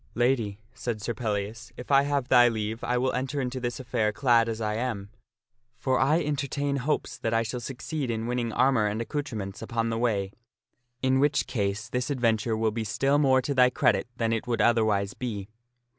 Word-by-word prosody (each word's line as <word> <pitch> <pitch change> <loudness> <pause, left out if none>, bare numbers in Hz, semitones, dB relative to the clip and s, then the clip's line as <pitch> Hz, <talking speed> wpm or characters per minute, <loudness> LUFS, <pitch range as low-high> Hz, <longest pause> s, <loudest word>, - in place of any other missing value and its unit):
" - - -31
Lady," 115 -6 0 0.2
said 115 -3 -4
Sir 115 +3 -3
Pellias, 110 +1 -3
" - - -30
if 125 - -7
I 135 0 +7
have 140 -2 -1
thy 120 -2 +7
leave, 110 -1 -2
I 125 - 0
will 130 +1 +1
enter 135 +3 -2
into 130 -1 -2
this 120 0 -3
affair 120 -4 0
clad 120 -3 +3
as 110 -1 -3
I 105 -1 -1
am. 105 -4 -3 0.7
For 130 +1 +1
I 150 +6 +3
entertain 145 -1 -1
hopes 140 +3 -2
that 115 0 -1
I 115 - +3
shall 120 +2 -4
succeed 135 +3 -4
in 115 -1 -2
winning 120 -1 -1
armor 120 -2 +3
and 105 +2 -2
accoutrements 115 -7 -4
upon 115 0 -1
the 115 - -1
way, 100 -5 0 0.7
in 130 0 +3
the 130 - +3
which 145 +1 +2
case 105 -2 -2
this 125 +3 -2
advent 115 -5 +1
ure 110 -1 0
will 110 0 +1
be 115 +1 -3
still 135 +7 +1
more 130 -3 +4
to 140 - -1
thy 125 -1 +5
credit 125 - +2
than 115 -1 +1
it 115 +2 -2
would 120 -1 0
otherwise 105 -4 +2
be." 105 -6 -5
120 Hz, 210 wpm, -27 LUFS, 110-130 Hz, 0.7 s, I